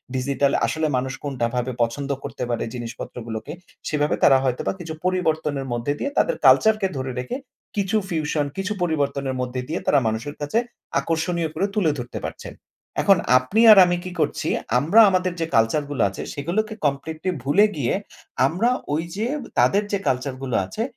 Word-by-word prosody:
Digital 140 +1 +1
আসলে 160 0 0
মানুষ 130 +1 -2
কোনটাভাবে 125 -2 -2
পছন্দ 135 +5 -3
করতে - - -5
পারে 120 - -1
জিনিসপত্রগুলোকে 115 0 -6 0.4
সেভাবে 150 -1 +1
তারা 135 - +7
হয়তোবা 130 -2 0
কিছু 165 -2 -6
পরিবর্তনের 155 -6 0
মধ্যে 120 +4 -1
দিয়ে 280 - -2
তাদের - - +3
কালচার 220 0 +6
কে 195 - +2
ধরে 130 0 -3
রেখে 125 - -4 0.4
কিছু 200 0 0
ফিউশন 155 -2 0
কিছু 195 +2 -1
পরিবর্তনের 140 -4 -1
মধ্যে 125 0 -3
দিয়ে 165 - -2
তারা 145 - +5
মানুষের 115 +7 -3
কাছে 145 +9 -1 0.4
আকর্ষণীয় 165 0 -1
করে 195 - +1
তুলে 185 -7 +3
ধরতে 125 0 -5
পারছেন। - - -7 0.5
এখন 195 -1 +5 0.2
আপনি 130 - +1
আর 210 - +9
আমি 175 0 +1
কি 185 - -6
করছি - - 0 0.3
আমরা 165 - +4
আমাদের 185 -1 +1
যে - - +1
কালচার 115 +7 +3
গুলা 130 -7 +2
আছে 95 - -7
সেগুলোকে 185 +10 -2
কমপ্লিটলি 155 +5 -1
ভুলে 165 +11 +5
গিয়ে 130 -5 0 0.5
আমরা 190 - +1 0.2
ওই 155 +2 0
যে 215 +3 -1 0.3
তাদের 200 +2 +4
যে 200 - 0
কালচার 130 +1 0
গুলো 125 -4 -2
আছে, 215 - -4
145 Hz, 165 wpm, -23 LUFS, 130-180 Hz, 0.5 s, আর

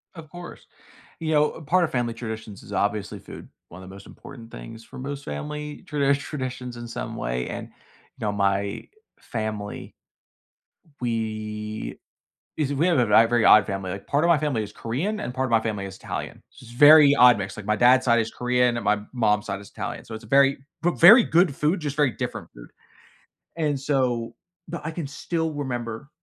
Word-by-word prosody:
Of 160 -3 -11
course. 175 +2 -10 0.5
You 160 -1 -2
know, 150 +1 +2
part 175 +4 +2
of - - -2
family 120 -2 -1
traditions 110 -3 -7
is - - -12
obviously 105 0 -1
food, - - -11 0.2
one 95 +2 -12
of 95 - -11
the 95 - -11
most 100 - -13
important 115 -4 -12
things 110 - -10
for - - -12
most 140 +2 -6
family 150 - -6
tradi 140 -2 +2
traditions 130 -4 -6
in 120 0 -7
some 115 - -5
way, - - -3
and, - - -6
you - - -29
know, 105 - 0
my 100 +1 -1 0.3
family 110 -2 -5 1.1
we 110 -2 -4 0.6
is 145 -2 0
we 160 +6 +2
have, 170 - +3
uh, 120 - +2
a 115 +2 +7
very 120 -1 +2
odd 105 -1 +7
family, 95 -2 -4
like, 100 +1 -8
part 145 +3 +1
of 170 - +3
my 170 - +5
family 145 -7 -1
is 105 - -8
Korean, 170 - -3
and 125 - -5
part 130 +1 -1
of 125 - -5
my 115 -1 +4
family 105 -3 -3
is 95 -1 -8
Italian, - - -6 0.2
it's 120 -1 -13
a - - -13
very 145 +1 +8
odd 125 -4 +7
mix. 95 -1 -5
Like, 105 - -8
my 105 - +2
dad's 125 +4 +5
side 120 -1 +4
is 110 0 -2
Korean, 125 -1 +1
and 120 - -4
my 105 0 +2
mom's 105 -4 +1
side 100 0 -3
is 100 - -13
Italian, - - -6
so 110 - -8
it's 110 - -9
a - - -13
very 135 +2 +4 0.3
v 175 - +3
very 215 +8 +9
good 165 -4 +2
food, 155 +6 +1
just 145 -3 -4
very 145 -4 +2
different - - -5
food, - - -13 0.9
and 150 -3 0
so 125 -5 -1 0.3
but 170 - -6
I 160 - -3
can 160 -3 -4
still 160 +3 -3
remember 125 -4 -5
120 Hz, 205 wpm, -24 LUFS, 105-145 Hz, 1.1 s, very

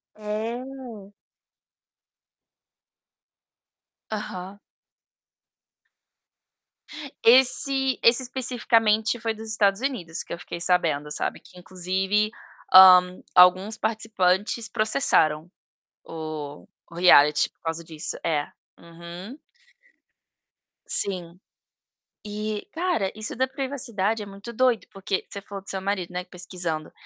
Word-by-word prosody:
É. 225 0 -6 3.0
Aham. 200 -2 -6 2.7
Esse 265 +2 +4
esse 235 +3 +5
especificamente 230 -3 +1
foi 225 -1 -2
dos 220 0 -9
Estados 200 -2 +2
Unidos 225 -12 -3
que - - -8
eu - - -5
fiquei 175 - -8
sabendo, 165 -4 0
sabe, - - -3
que - - -19
inclusive, 190 +3 -1 0.4
hã, 185 -1 +8
alguns 185 +4 +5
participantes 215 0 0
processaram 165 - +1 0.5
o 155 -2 -7 0.2
o - - -12
reality 150 -4 +5
por - - -50
causa 165 0 -4
disso. 160 -1 -5
É. 150 -3 0 0.3
Uhum. 170 - -11 1.5
Sim. 180 -3 0 0.9
E, 210 0 -4
cara, 330 - -1
isso 215 +1 -5
da 260 +2 0
privacidade 240 -6 -3
é - - -6
muito 200 +4 -10
doido, 250 -1 +1
porque 195 0 -3
você 200 - -7
falou 200 -1 -9
do - - -10
seu 190 - -3
marido, 190 -2 -3
né, 180 0 -4
pesquisando. 175 -4 -5
200 Hz, 100 wpm, -24 LUFS, 180-225 Hz, 3.0 s, hã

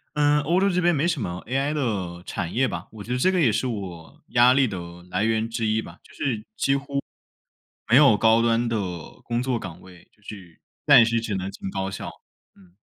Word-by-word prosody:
呃， 150 0 +3
欧 170 +6 +1
洲 195 0 +3
这 180 0 +1
边 175 -1 +3
没 155 +4 +1
什 160 -7 -1
么 90 -3 -4
AI 135 +4 -1
的 95 - -3
产 85 -4 -4
业 130 +1 +2
吧， 85 +1 -6
我 105 -2 -9
觉 120 - -11
得 125 - 0
这 185 +8 +3
个 180 - +1
也 125 -8 +4
是 120 +5 -1
我 95 -8 -7
压 120 +1 +5
力 135 -2 +3
的 95 -3 -5 0.3
来 95 +4 0
源 110 0 0
之 115 -1 -2
一 110 +1 +1
吧， 85 - -12
就 140 - -19
是 125 -6 -2 0.2
几 - - -1 1.0
乎 120 - -4
没 - - +8
有 135 -7 +7
高 110 +1 +4
端 115 0 +2
的 115 - -1 0.5
工 120 +1 -1
作 125 -2 -1
岗 90 -4 -9
位， 90 -2 -16
就 105 - -31
是 95 -6 -11 0.3
暂 135 -6 +8
时 115 0 0
只 110 -3 -3
能 95 0 -3
进 95 -1 -7
高 95 0 -3
校。 95 - -6 0.5
嗯。 90 -2 -22
115 Hz, 245 characters per minute, -24 LUFS, 95-135 Hz, 1.0 s, 没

